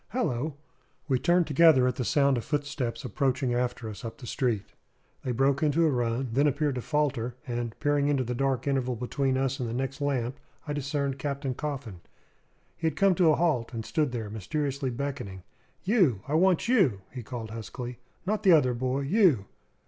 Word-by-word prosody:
Hallo!" 150 - -1 0.5
We 130 -3 +2
turned 175 +4 +3
together 150 -3 +5
at 125 -1 +1
the 125 - -2
sound 140 +2 +3
of 115 - -3
footsteps 135 -5 -3
approaching 130 +1 0
after 120 -1 -1
us 105 -3 -8
up 115 - -6
the 130 - -10
street. 120 -4 -1 0.5
They 130 - -2
broke 135 +3 +2
into 155 +2 +3
a 155 - +3
run, 120 0 -1
then 140 +4 +4
appeared 145 0 +1
to 125 - -3
falter; 125 -5 -1
and, 120 -3 -4
peering 145 -1 +2
into 140 -3 +2
the 125 0 -3
dark 130 0 0
interval 130 -3 0
between 130 +3 -1
us 135 +1 0
and 120 -2 -2
the 115 - -3
next 135 +2 -3
lamp, 130 -3 -1 0.3
I 145 - -2
discerned 140 -1 -2
Captain 140 -1 -2
Coffin. 130 - -5 0.7
He 165 - -1
had 155 - -1
come 195 -1 +5
to 175 -2 +4
a 155 - +5
halt, 135 -9 0
and 115 -1 -4
stood 145 +5 0
there 110 -4 -4
mysteriously 135 +6 -2
beckoning. 120 -8 -5 0.4
"You 180 - +3
I 145 - -3
want 180 +3 +3
you!" 180 - +3
he 125 - -6
called 115 -1 -6
huskily. 120 +2 -6 0.3
"Not 210 +3 0
the 185 - +6
other 130 -6 +4
boy! 130 +3 -1
You!" 150 - +3
135 Hz, 190 wpm, -28 LUFS, 120-145 Hz, 0.7 s, the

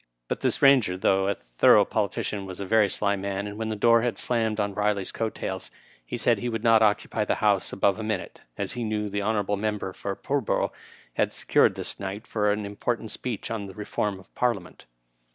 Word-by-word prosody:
But - - -2
this - - +1
Bainger, 130 -10 +5
thongh 95 +1 +2
a 100 - +1
thorough - - +4
politician, 100 -2 -2
was 95 0 -7
a 100 - -3
very 105 0 +4
sly 100 0 +1
man, 100 0 -3
and 105 0 -6
when 110 +1 -3
the 110 - -2
door 115 +2 +5
had 120 -1 -1
slammed 110 -3 0
on 100 -1 0
Biley's 105 -1 0
coat 115 -1 -3
tails, 95 -1 -4 0.3
he - - -5
said - - +2
he 120 - -2
would 115 -1 -3
not 115 -2 +5
occupy 105 0 +2
the - - 0
House 100 -3 +1
above 100 +2 +1
a - - -3
minute, 110 -4 -3 0.2
as 100 -1 -2
he 120 - -4
knew 105 -1 -1
the 100 +1 -2
hon. 105 0 0 0.2
member 105 -3 -2
for 100 +1 -4
Pull 140 +6 -1
borough 110 - 0 0.4
had - - 0
secured - - +3
this - - -6
night 100 +3 -5
for 105 -2 +1
an 105 0 -2
important 110 +2 -3
speech 120 -4 -4
on 105 -3 -3
the 95 - -11
reform 105 -1 -2
of 95 - -15
the - - -33
Parliament. 110 -8 -2
105 Hz, 220 wpm, -26 LUFS, 100-110 Hz, 0.4 s, Bainger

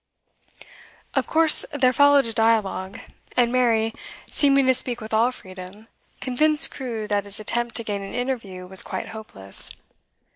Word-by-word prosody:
Of - - -1
course 320 -1 +5
there 260 -3 +2
followed 285 0 +5
a 230 - -2
dialogue; 215 -4 0 0.4
and 240 -1 +3
Mary, 230 -3 +1 0.4
seeming 275 -2 +3
to 260 - +4
speak 245 -1 -2
with 220 -1 -9
all 230 +3 +3
freedom, 190 0 -11 0.3
convinced 300 +4 +3
Crewe 230 -5 -5
that 205 -1 -1
his 200 +1 -4
attempt 235 +2 -2
to 230 - +2
gain 205 -2 -4
an 195 - -8
interview 230 -8 -4
was 190 +1 +1
quite - - -6
hopeless. 155 - -2
230 Hz, 150 wpm, -23 LUFS, 205-255 Hz, 0.4 s, course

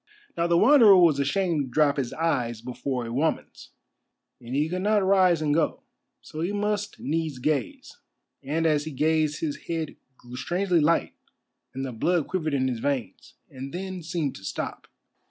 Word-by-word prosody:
Now 170 0 0
the 170 0 +3
Wanderer 230 -4 +7
was 165 -6 +5
ashamed 165 +2 +1
to 135 - -4
drop 145 +1 +3
his 130 -4 -2
eyes 125 -9 -1
before 125 +1 -4
a 115 - -6
woman's, 155 +6 -2 0.7
and 120 +2 -7
he 150 +2 +1
could 180 +3 -3
not 205 0 +2
rise 185 -4 +4
and 145 -1 +1
go; 160 +1 0 0.4
so 155 - -8
he 175 +4 -1
must 210 0 -2
needs 155 -2 -2
gaze, 155 - -3 0.4
and 155 +4 -1
as 150 -2 +2
he 155 - -5
gazed 155 +1 +1
his 150 -3 -4
head 165 -3 -3 0.2
grew 120 0 -12
strangely 180 +4 0
light 160 +2 +2 0.6
and 135 0 -3
the 130 - -4
blood 165 +7 0
quivered 155 -6 -1
in 130 -1 +1
his 125 -3 -2
veins, 125 -8 -4 0.2
and 135 +4 -8
then 185 0 -5
seemed 160 -4 -3
to 95 - -14
stop. - - -5
155 Hz, 175 wpm, -26 LUFS, 135-175 Hz, 0.7 s, Wanderer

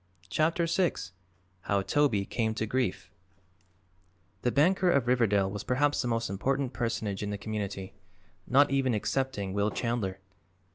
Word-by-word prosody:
CHAPTER 165 - +1
VI 170 +1 +2 0.7
HOW 100 -1 +1
TOBY 105 -2 +2
CAME 110 +1 -1
TO 110 - -1
GRIEF 120 -3 -2 1.3
The 125 - +1
banker 180 +6 +3
of 140 -7 +3
Riverdale 105 -6 +2
was 100 -1 -5
perhaps 145 +3 +1
the 125 - -2
most 115 -1 0
important 130 +7 -1
personage 110 -4 -2
in 105 - -3
the 105 - -3
community, 100 -2 -4 0.5
not 140 +3 +4
even 135 -3 +2
excepting 105 -4 -1
Will 100 +1 +1
Chandler. 110 -5 -2
115 Hz, 140 wpm, -29 LUFS, 100-135 Hz, 1.3 s, not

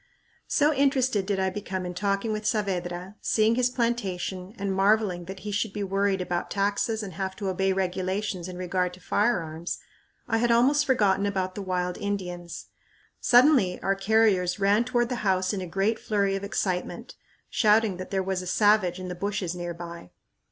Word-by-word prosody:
So 300 +1 +3
interested 260 -7 +2
did 200 -2 0
I 190 0 +1
become 190 -2 -4
in 180 - -4
talking 200 +3 -1
with 215 0 -3
Saavedra, 185 -2 -2
seeing 220 0 +3
his 245 +1 +2
plantation, 200 -5 -2
and 200 -1 -2
marveling 195 -2 +2
that 190 +1 -8
he 210 +2 -5
should 205 0 -1
be 210 - -3
worried 195 0 0
about 175 -1 -2
taxes 205 +2 0
and 195 -3 -7
have 190 +1 -4
to 200 -1 -3
obey 190 +1 +1
regulations 185 0 -2
in 180 -1 -7
regard 180 0 -1
to - - -17
firearms, 175 -5 -1 0.5
I 225 - +1
had 240 +1 +2
almost 275 +6 +4
forgotten 205 -6 +3
about 190 -2 -2
the 205 - -6
wild 180 -2 -2
Indians. 180 -4 -4 0.5
Suddenly 245 -7 +4
our 195 - +2
carriers 195 -2 +2
ran 205 +4 +3
toward 240 -1 +1
the 250 - -1
house 190 -2 +1
in 195 - -2
a 180 - -5
great 195 +6 0
flurry 200 -2 0
of 195 - -4
excitement, 185 -3 -3 0.4
shouting 215 -3 +3
that 185 - -7
there 190 -1 0
was 190 -1 -2
a 180 - -7
"savage" 200 -2 +3
in 185 - -6
the 180 - -4
bushes 195 -1 -2
near 175 -1 -5
by. 170 - -9
195 Hz, 180 wpm, -26 LUFS, 185-215 Hz, 0.5 s, almost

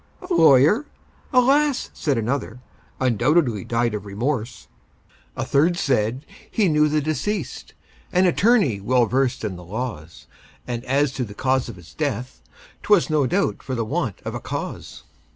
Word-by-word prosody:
"A 365 0 -3
lawyer? 160 - +5 0.4
Alas!" 275 +2 +3
said 140 -5 -1
another, 120 +1 -2 0.4
"Undoubtedly 125 - +2
died 115 -1 0
of 105 -2 -4
remorse!" 115 +1 -3 0.7
A - - -2
third 165 +5 +2
said, 125 -2 0 0.2
"He 210 -4 +1
knew 150 -1 +3
the 155 0 +1
deceased, 155 +5 -3 0.4
An 180 +1 +3
attorney 185 - +3
well 125 +3 +3
versed 125 +2 0
in 100 -5 -3
the 90 - -11
laws, 90 -5 -6 0.4
And 120 -1 -4
as 140 +1 +1
to 135 - -3
the 100 -3 -8
cause 130 0 0
of 115 - -8
his 85 -2 -15
death, 130 -4 -3 0.4
'Twas 200 -6 +3
no 150 -4 +2
doubt 195 +6 0
for 130 - -4
the 115 -2 -2
want - - -3
of - - -4
a - - -4
cause." - - -6
130 Hz, 155 wpm, -22 LUFS, 115-155 Hz, 0.7 s, lawyer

